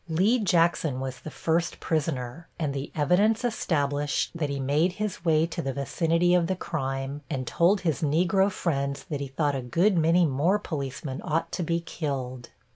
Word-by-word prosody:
Lee 195 +10 +3
Jackson 170 - +2
was 130 0 -5
the - - -8
first 165 +2 -1
prisoner, 150 -1 -2
and 150 -4 -1
the 140 +1 -5
evidence 205 - +3
established 145 - 0
that 160 -4 -2
he 140 -1 -3
made 150 +7 +2
his 210 -3 -4
way 160 -2 +3
to 170 - -4
the 135 -1 -3
vicinity 165 +5 +1
of 175 -2 +3
the 190 - 0
crime 135 -4 -3
and 135 -4 -2
told 180 - +3
his 160 -7 -1
Negro 175 +6 +2
friends 140 -7 -2
that 145 -2 -2
he 140 - -3
thought 145 +2 0
a 135 - -2
good 170 - +2
many 170 +2 +4
more 155 +8 +2
policemen 140 -6 -5
ought 160 +2 -1
to - - -3
be 170 0 0
killed. 135 -7 -4
160 Hz, 180 wpm, -27 LUFS, 140-175 Hz, -, many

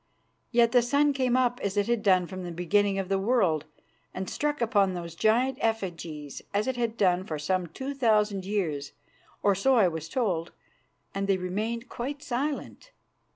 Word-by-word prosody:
Yet 235 -1 +4
the 245 0 +5
sun 285 +4 +2
came 255 -2 +1
up 245 -1 +1
as 200 0 -2
it 205 - +3
had 235 -1 0
done 185 -3 +4
from 185 +1 -7
the 175 - -5
beginning 195 +4 +1
of 195 -1 -2
the 195 0 +1
world, 190 - +2 0.5
and 185 0 -4
struck 295 +7 -1
upon 200 -5 +2
those 170 -1 -6
giant 240 +8 +2
effigies 170 -9 -3
as 205 +1 +2
it 260 - -1
had 235 -2 -2
done 185 -3 +3
for 155 -5 -4
some 175 +4 -1
two 265 - -5
thousand 215 -6 +2
years, 175 -8 -2 0.5
or 200 - +5
so 260 +8 +3
I 215 -6 +5
was 160 -1 -4
told, 180 -9 -1 0.6
and 195 0 -2
they 195 -1 +3
remained 215 +6 -3
quite 280 +5 -5
silent. 280 - -3
205 Hz, 180 wpm, -28 LUFS, 180-240 Hz, 0.6 s, the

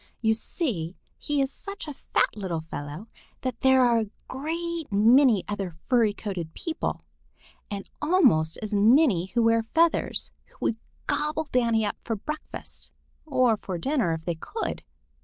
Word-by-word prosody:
You 220 -1 +3
see, 220 - -2 0.2
he 290 -2 +1
is 270 - -3
such 400 -4 -7
a 295 - -4
fat - - 0
little 185 -6 -3
fellow 155 +4 -7 0.3
that 255 -3 -3
there 265 -1 +6
are 235 -1 +4
a 220 -2 -2 0.2
great 330 +2 -4
many 225 +1 +5
other 195 -5 -4
furry 235 -5 +4
coated 185 -6 -5
people, 330 -1 -3 0.6
and 200 -1 -5
almost 265 - +3
as 215 0 -4
many 210 - +5
who 235 +4 +1
wear 230 0 +4
feathers, 330 +9 +1 0.2
who - - -25
would 225 - 0 0.3
gobble 305 +1 -1
Danny 230 -3 +2
up 205 - -2
for 225 - -2
breakfast 305 +9 -7 0.4
or 255 -6 +3
for 185 -3 -5
dinner 250 - +1
if 160 0 -5
they 175 - 0
could. 435 - -4
230 Hz, 155 wpm, -26 LUFS, 200-285 Hz, 0.6 s, there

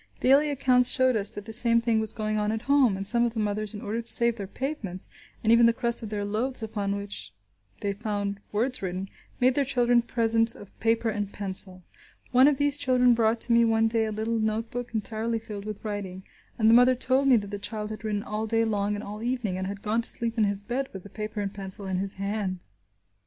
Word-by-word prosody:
Daily 280 +4 +4
accounts 255 -3 +4
showed 260 -1 +2
us 205 -1 0
that 205 - -7
the 225 - -6
same 235 0 +6
thing 230 -1 +1
was 220 -1 0
going 215 -1 -2
on 210 0 0
at 220 +1 -4
home, 270 -8 +3
and 195 0 -1
some 235 +2 +5
of 240 -1 -1
the - - -2
mothers, 210 0 -2
in 205 - -7
order 225 +3 -3
to 235 - +3
save 235 -1 +3
their 200 -4 -7
pavements, 210 -6 -4 0.4
and 220 - +3
even 235 0 +6
the 230 - +3
crust 235 -1 0
of 220 - -6
their 205 -1 -3
loaves 230 +4 -3
upon 205 -2 -3
which 200 0 -5 0.5
they 200 -1 -1
found 205 -1 -4
words 245 +5 -1
written, 185 0 -4 0.3
made 255 +1 +3
their 285 - +1
children 245 -2 +2
presents 230 -1 +3
of 205 - -14
paper 225 0 +1
and 205 -2 -4
pencil. 190 -2 0 0.5
One 255 +2 +6
of 295 -2 +2
these 285 0 +3
children 255 -3 +3
brought 225 0 +1
to 235 - +3
me 235 0 +5
one 225 -1 +2
day 225 0 +1
a 215 - -3
little 220 +2 -2
note 220 +1 -2
book 245 0 -5
entirely 220 +2 -1
filled 210 -2 -8
with 215 0 -7
writing, 195 -3 -5 0.3
and 220 - +2
the 225 - +6
mother 250 +2 +6
told 260 +2 +1
me 260 - +6
that 205 -3 -2
the 205 - -5
child 215 0 -5
had 215 - -8
written 210 -2 -2
all 215 +1 -4
day 225 +1 +1
long 205 -1 -1
and 205 - -6
all 210 +1 -8
evening, 240 -5 -2
and 190 0 -4
had 200 0 -7
gone 220 +2 0
to - - +3
sleep 230 -1 +2
in 220 -3 +2
his 200 0 -1
bed 255 +5 -3
with 190 -2 -8
the 200 - -13
paper 215 -1 -5
and 200 0 -4
pencil 195 0 -7
in 190 -1 -2
his 195 0 -4
hand. 195 -2 -4
220 Hz, 240 wpm, -26 LUFS, 205-235 Hz, 0.5 s, same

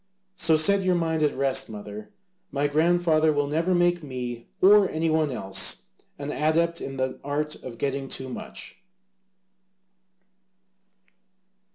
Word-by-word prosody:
So 165 -4 +3
set 195 +6 +4
your 185 -1 +1
mind 165 -2 -1
at 150 -3 +1
rest, 135 -1 +1
mother, 105 0 -9 0.4
my 145 0 -1
grandfather 160 +1 +2
will 145 -1 0
never 165 +5 0
make 175 0 +2
me, 125 -4 -6
or 200 0 +6
any 160 +1 -1
one 155 -1 +1
else, 95 -6 +1 0.3
an 140 +1 -5
adept 165 +3 0
in 135 0 -6
the 130 0 -2
art 150 +2 -2
of 120 -3 -10
getting 140 +1 -2
too 130 0 -4
much." 130 - -9
150 Hz, 135 wpm, -25 LUFS, 135-170 Hz, 0.4 s, or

